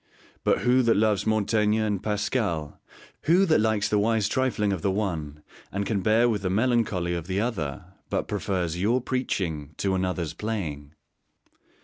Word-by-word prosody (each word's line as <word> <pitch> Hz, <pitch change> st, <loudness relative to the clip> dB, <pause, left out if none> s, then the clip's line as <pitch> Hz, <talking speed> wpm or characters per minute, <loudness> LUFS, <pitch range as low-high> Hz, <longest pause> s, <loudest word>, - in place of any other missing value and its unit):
But -, -, +2 dB
who 125 Hz, +2 st, +4 dB
that 115 Hz, -4 st, +3 dB
loves 105 Hz, -1 st, +2 dB
Montaigne 110 Hz, 0 st, +2 dB
and 105 Hz, -3 st, 0 dB
Pascal, 105 Hz, -, -2 dB, 0.4 s
who 180 Hz, +5 st, +5 dB
that 155 Hz, -, +3 dB
likes 110 Hz, -2 st, +1 dB
the 105 Hz, -, +2 dB
wise 110 Hz, -1 st, +2 dB
trifling 110 Hz, -5 st, 0 dB
of 90 Hz, -, -4 dB
the 100 Hz, -, +1 dB
one 80 Hz, -7 st, -3 dB, 0.3 s
and 100 Hz, +1 st, -2 dB
can 100 Hz, -3 st, -1 dB
bear 110 Hz, +5 st, +4 dB
with 110 Hz, -4 st, 0 dB
the 95 Hz, -, -1 dB
melancholy 105 Hz, -5 st, +1 dB
of 85 Hz, -1 st, -4 dB
the 95 Hz, +1 st, -1 dB
other, 95 Hz, -, -3 dB, 0.2 s
but -, -, -1 dB
prefers 90 Hz, -3 st, -2 dB
your 115 Hz, +6 st, +2 dB
preaching 85 Hz, -, -3 dB
to 95 Hz, -1 st, 0 dB
another's 90 Hz, -4 st, -1 dB
playing! 80 Hz, -9 st, -4 dB
100 Hz, 160 wpm, -26 LUFS, 90-110 Hz, 0.4 s, who